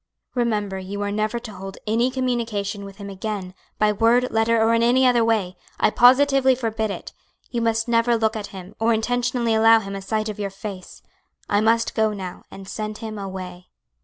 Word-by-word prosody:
Remember 210 Hz, -6 st, -1 dB
you 200 Hz, +2 st, -5 dB
are 205 Hz, -, -2 dB
never 215 Hz, +3 st, -1 dB
to 235 Hz, -3 st, -8 dB
hold 195 Hz, 0 st, -8 dB
any 230 Hz, +4 st, +2 dB
communication 230 Hz, -6 st, -2 dB
with 195 Hz, -1 st, -10 dB
him 200 Hz, -1 st, -8 dB
again 195 Hz, -1 st, -5 dB, 0.2 s
by 210 Hz, 0 st, +3 dB
word, 230 Hz, +4 st, +2 dB
letter, 225 Hz, +1 st, +2 dB
or 225 Hz, +1 st, +3 dB
in 230 Hz, -, +3 dB
any 250 Hz, +3 st, +4 dB
other 245 Hz, -2 st, +4 dB
way; 215 Hz, -5 st, 0 dB, 0.2 s
I -, -, +3 dB
positively 265 Hz, +2 st, +5 dB
forbid 225 Hz, -3 st, -2 dB
it; 200 Hz, -, -7 dB, 0.4 s
you 235 Hz, -, -1 dB
must 225 Hz, 0 st, 0 dB
never 235 Hz, 0 st, +3 dB
look 220 Hz, 0 st, 0 dB
at 210 Hz, -2 st, -4 dB
him, 185 Hz, -2 st, -10 dB
or 225 Hz, +1 st, +3 dB
intentionally 240 Hz, +1 st, 0 dB
allow 225 Hz, +1 st, +6 dB
him 195 Hz, -2 st, -6 dB
a 195 Hz, -, -5 dB
sight 215 Hz, +2 st, -2 dB
of 210 Hz, -1 st, -6 dB
your 200 Hz, -1 st, -2 dB
face. 195 Hz, -1 st, -9 dB, 0.4 s
I 205 Hz, 0 st, +2 dB
must 230 Hz, +1 st, +2 dB
go 220 Hz, -1 st, +1 dB
now, 185 Hz, -3 st, -7 dB
and 195 Hz, 0 st, -11 dB
send 215 Hz, +1 st, -5 dB
him 215 Hz, -1 st, -6 dB
away." 185 Hz, -2 st, -7 dB
220 Hz, 195 wpm, -23 LUFS, 200-235 Hz, 0.4 s, allow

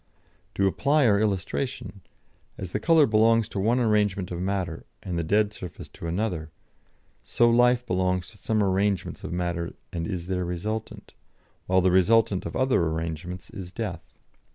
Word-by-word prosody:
To 100 Hz, -, +2 dB
apply 140 Hz, -, +2 dB
our 100 Hz, -3 st, +4 dB
illustration: 105 Hz, +1 st, -2 dB, 0.6 s
as 95 Hz, -3 st, -6 dB
the -, -, -1 dB
colour 165 Hz, -3 st, +5 dB
belongs 115 Hz, -1 st, +3 dB
to 100 Hz, -, -4 dB
one 115 Hz, +6 st, +2 dB
arrangement 105 Hz, -5 st, +1 dB
of 85 Hz, -, -4 dB
matter 95 Hz, -3 st, -2 dB, 0.2 s
and 90 Hz, -2 st, -4 dB
the 85 Hz, -, 0 dB
dead 105 Hz, +5 st, +2 dB
surface 90 Hz, -5 st, -9 dB
to 85 Hz, -, -8 dB
another, 85 Hz, -3 st, -2 dB, 0.7 s
so 120 Hz, 0 st, +3 dB
life 125 Hz, +1 st, +4 dB
belongs 90 Hz, -2 st, 0 dB
to 105 Hz, -, -16 dB
some 110 Hz, -2 st, +1 dB
arrangements 95 Hz, 0 st, 0 dB
of -, -, -5 dB
matter 85 Hz, -1 st, -2 dB, 0.2 s
and 85 Hz, -1 st, -3 dB
is 90 Hz, -3 st, -4 dB
their 90 Hz, 0 st, -2 dB
resultant, 95 Hz, +6 st, -5 dB, 0.5 s
while 95 Hz, 0 st, +3 dB
the 90 Hz, 0 st, +3 dB
resultant 95 Hz, +1 st, +3 dB
of -, -, -7 dB
other 130 Hz, -6 st, +2 dB
arrangements 80 Hz, +3 st, -5 dB
is 90 Hz, -2 st, -8 dB
death." 95 Hz, -6 st, -6 dB
95 Hz, 160 wpm, -26 LUFS, 90-110 Hz, 0.7 s, colour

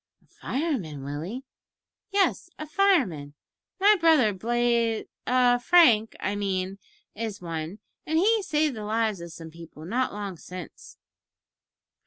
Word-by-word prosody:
"A -, -, -30 dB
fireman, 230 Hz, -, -4 dB
Willie?" 160 Hz, -, -5 dB, 0.7 s
"Yes, 390 Hz, -3 st, +1 dB
a 310 Hz, -, -6 dB
fireman. 270 Hz, -, +1 dB, 0.4 s
My 410 Hz, +2 st, +6 dB
brother, 310 Hz, -10 st, +4 dB
Blaz 235 Hz, +2 st, 0 dB, 0.2 s
a 250 Hz, -1 st, +4 dB
Frank, 245 Hz, -8 st, +5 dB
I 200 Hz, +2 st, -2 dB
mean, 195 Hz, -1 st, -2 dB, 0.3 s
is 220 Hz, -1 st, -5 dB
one, 165 Hz, +1 st, -5 dB, 0.3 s
and 315 Hz, +1 st, +1 dB
he 430 Hz, +5 st, +3 dB
saved 305 Hz, -6 st, 0 dB
the 215 Hz, -, -6 dB
lives 215 Hz, -3 st, -1 dB
of 170 Hz, 0 st, -8 dB
some 160 Hz, 0 st, -10 dB
people 165 Hz, -1 st, -12 dB
not 250 Hz, +8 st, -1 dB
long 200 Hz, -3 st, -6 dB
since." 180 Hz, 0 st, -10 dB
225 Hz, 130 wpm, -26 LUFS, 185-300 Hz, 0.7 s, My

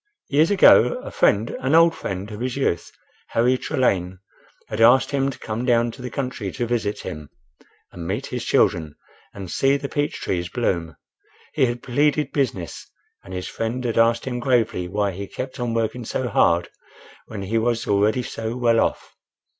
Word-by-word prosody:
Years 155 Hz, +3 st, +3 dB
ago, 205 Hz, -, +6 dB
a -, -, -7 dB
friend—an 120 Hz, +7 st, +1 dB
old 165 Hz, 0 st, +6 dB
friend 95 Hz, -, -5 dB
of 105 Hz, -, -7 dB
his 125 Hz, +2 st, -3 dB
youth, 85 Hz, -, -1 dB, 0.4 s
Harry 120 Hz, +3 st, +2 dB
Trelane, 100 Hz, -, 0 dB, 0.5 s
had 110 Hz, +1 st, -3 dB
asked 120 Hz, +3 st, +5 dB
him 135 Hz, -1 st, +1 dB
to 135 Hz, -, -7 dB
come 110 Hz, +2 st, -4 dB
down 120 Hz, -2 st, +2 dB
to 125 Hz, -, -12 dB
the 125 Hz, -, -5 dB
country 125 Hz, -6 st, -4 dB
to 120 Hz, -, -2 dB
visit 110 Hz, -3 st, -2 dB
him 75 Hz, -2 st, -7 dB, 0.6 s
and 85 Hz, -2 st, -7 dB
meet -, -, -2 dB
his -, -, -2 dB
children 80 Hz, -3 st, +1 dB, 0.4 s
and 95 Hz, -3 st, -8 dB
see 135 Hz, +1 st, +2 dB
the 140 Hz, 0 st, -5 dB
peach 145 Hz, +1 st, -2 dB
trees 90 Hz, -1 st, -2 dB
bloom. 85 Hz, -8 st, -2 dB, 0.6 s
He 130 Hz, -, +3 dB
had 120 Hz, 0 st, -4 dB
pleaded 145 Hz, +3 st, +1 dB
business, 125 Hz, -, -3 dB, 0.3 s
and 95 Hz, -, -12 dB
his 90 Hz, 0 st, -4 dB
friend 115 Hz, +3 st, -3 dB
had 115 Hz, -1 st, 0 dB
asked 115 Hz, 0 st, +3 dB
him 125 Hz, -2 st, -3 dB
gravely 115 Hz, -7 st, +1 dB
why 100 Hz, +2 st, -1 dB
he 100 Hz, +2 st, -6 dB
kept 130 Hz, +5 st, -6 dB
on 120 Hz, -1 st, -2 dB
working 115 Hz, +2 st, -1 dB
so 125 Hz, +3 st, -2 dB
hard 85 Hz, -4 st, +2 dB, 0.6 s
when 105 Hz, -3 st, -6 dB
he 110 Hz, +4 st, 0 dB
was 115 Hz, 0 st, 0 dB
already 105 Hz, +5 st, +2 dB
so 115 Hz, 0 st, -5 dB
well 115 Hz, -2 st, +3 dB
off. -, -, -1 dB
115 Hz, 180 wpm, -22 LUFS, 100-130 Hz, 0.6 s, ago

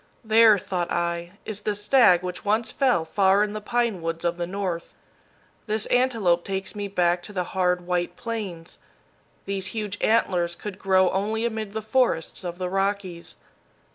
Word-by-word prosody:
"There," 220 Hz, -1 st, +6 dB
thought 185 Hz, -3 st, -3 dB
I, 170 Hz, +1 st, -2 dB
"is 210 Hz, -1 st, -5 dB
the 210 Hz, 0 st, -1 dB
stag 205 Hz, -4 st, +4 dB
which 180 Hz, 0 st, -5 dB
once 220 Hz, +2 st, 0 dB
fell 250 Hz, -12 st, +2 dB
far 195 Hz, +4 st, +3 dB
in 210 Hz, 0 st, -3 dB
the 215 Hz, -, -5 dB
pine 235 Hz, -4 st, 0 dB
woods 165 Hz, +1 st, -3 dB
of 170 Hz, 0 st, 0 dB
the 175 Hz, -1 st, -3 dB
North. 180 Hz, -3 st, -4 dB, 0.7 s
This 215 Hz, 0 st, 0 dB
antelope 225 Hz, -9 st, +2 dB
takes 195 Hz, -1 st, -4 dB
me 205 Hz, -1 st, -4 dB
back 175 Hz, -2 st, +1 dB
to 210 Hz, -, -10 dB
the 180 Hz, -2 st, -1 dB
hard, 180 Hz, -1 st, 0 dB
white 175 Hz, 0 st, -1 dB
Plains. 200 Hz, -8 st, -6 dB, 0.7 s
These 195 Hz, -1 st, -2 dB
huge 205 Hz, -2 st, -3 dB
antlers 175 Hz, -6 st, +2 dB
could 205 Hz, 0 st, -8 dB
grow 190 Hz, -2 st, +3 dB
only 215 Hz, +4 st, -1 dB
amid 220 Hz, -3 st, -3 dB
the 220 Hz, 0 st, -4 dB
forests 225 Hz, -, 0 dB
of 175 Hz, -1 st, -5 dB
the 180 Hz, 0 st, -3 dB
Rockies. 195 Hz, -2 st, -2 dB
195 Hz, 170 wpm, -25 LUFS, 175-215 Hz, 0.7 s, There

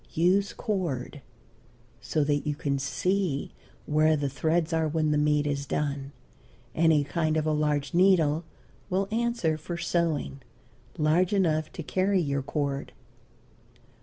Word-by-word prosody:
Use 185 Hz, +5 st, +3 dB
cord, 170 Hz, -, -3 dB, 0.8 s
so 125 Hz, +5 st, 0 dB
that 145 Hz, +1 st, 0 dB
you 150 Hz, -, 0 dB
can 140 Hz, -1 st, -1 dB
see 170 Hz, +2 st, -1 dB, 0.3 s
where 155 Hz, +1 st, +3 dB
the 145 Hz, -1 st, -1 dB
threads 160 Hz, +4 st, 0 dB
are 160 Hz, -1 st, +1 dB
when 155 Hz, 0 st, 0 dB
the 150 Hz, -, +2 dB
meat 150 Hz, 0 st, +2 dB
is 140 Hz, -1 st, -2 dB
done. 140 Hz, -2 st, -2 dB, 0.6 s
Any 160 Hz, -2 st, +3 dB
kind 155 Hz, +1 st, 0 dB
of 155 Hz, -, 0 dB
a 155 Hz, -, +1 dB
large 150 Hz, -2 st, 0 dB
needle 170 Hz, -4 st, +4 dB, 0.5 s
will 195 Hz, +1 st, 0 dB
answer 230 Hz, -9 st, 0 dB
for 170 Hz, +3 st, -5 dB
sewing, 165 Hz, -, -1 dB, 0.6 s
large 165 Hz, +5 st, +2 dB
enough 160 Hz, -6 st, +1 dB
to 165 Hz, -, -6 dB
carry 190 Hz, +5 st, +1 dB
your 140 Hz, -4 st, -1 dB
cord. 140 Hz, 0 st, -3 dB
155 Hz, 135 wpm, -27 LUFS, 145-175 Hz, 0.8 s, needle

